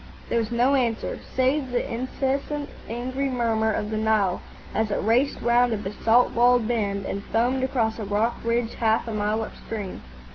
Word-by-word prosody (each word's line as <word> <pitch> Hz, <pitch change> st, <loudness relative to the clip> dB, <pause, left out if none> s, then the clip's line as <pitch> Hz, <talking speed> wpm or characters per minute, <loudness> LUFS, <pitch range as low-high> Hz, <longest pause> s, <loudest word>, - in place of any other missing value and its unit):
There 235 Hz, -, +2 dB
was 225 Hz, -2 st, -2 dB
no 245 Hz, +3 st, +3 dB
answer, 235 Hz, -4 st, 0 dB, 0.2 s
save 260 Hz, +1 st, +2 dB
the 245 Hz, -1 st, -2 dB
incessant 275 Hz, +4 st, -2 dB, 0.2 s
angry 255 Hz, +4 st, -2 dB
murmur 225 Hz, -3 st, +1 dB
of 210 Hz, 0 st, -2 dB
the 215 Hz, -, -1 dB
Nile 215 Hz, -4 st, +1 dB, 0.3 s
as 220 Hz, -1 st, 0 dB
it 200 Hz, -, 0 dB
raced 240 Hz, +6 st, +2 dB
round 240 Hz, 0 st, +3 dB
a -, -, 0 dB
basalt 220 Hz, +4 st, +2 dB
walled 240 Hz, -1 st, +4 dB
bend 200 Hz, -4 st, -1 dB
and 200 Hz, -, -4 dB
foamed 250 Hz, +3 st, +1 dB
across 235 Hz, -4 st, 0 dB
a -, -, -3 dB
rock 210 Hz, +4 st, 0 dB
ridge 230 Hz, 0 st, 0 dB
half 225 Hz, 0 st, +1 dB
a 225 Hz, -, -3 dB
mile 210 Hz, +1 st, 0 dB
upstream. 210 Hz, -3 st, -6 dB
230 Hz, 175 wpm, -25 LUFS, 220-250 Hz, 0.3 s, walled